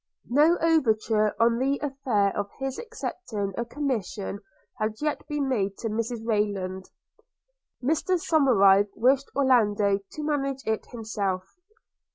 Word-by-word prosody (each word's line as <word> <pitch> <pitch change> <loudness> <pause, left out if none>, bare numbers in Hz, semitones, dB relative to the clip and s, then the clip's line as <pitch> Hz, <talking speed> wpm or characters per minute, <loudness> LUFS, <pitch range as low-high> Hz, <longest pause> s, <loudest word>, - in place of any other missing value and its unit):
No 305 +6 +5
overture 220 -9 +2
on 230 +1 +3
the 275 +2 +1
affair 260 -8 0
of 205 0 -2
his 270 -1 -4
accepting 240 - -5
a 235 - -1
commission 230 -7 -3 0.4
had 215 0 -1
yet 300 0 -2
been 295 -2 -1
made 200 -7 -1
to 225 - -3
Mrs 230 +1 -3
Rayland. 200 -4 -1 0.9
Mr 325 +6 +1
Somerive 205 - +4
wished 265 +4 +2
Orlando 210 -7 +3
to 200 +10 -9
manage 275 -3 -2
it 220 -1 -2
himself. 205 -5 -3
230 Hz, 125 wpm, -26 LUFS, 205-275 Hz, 0.9 s, No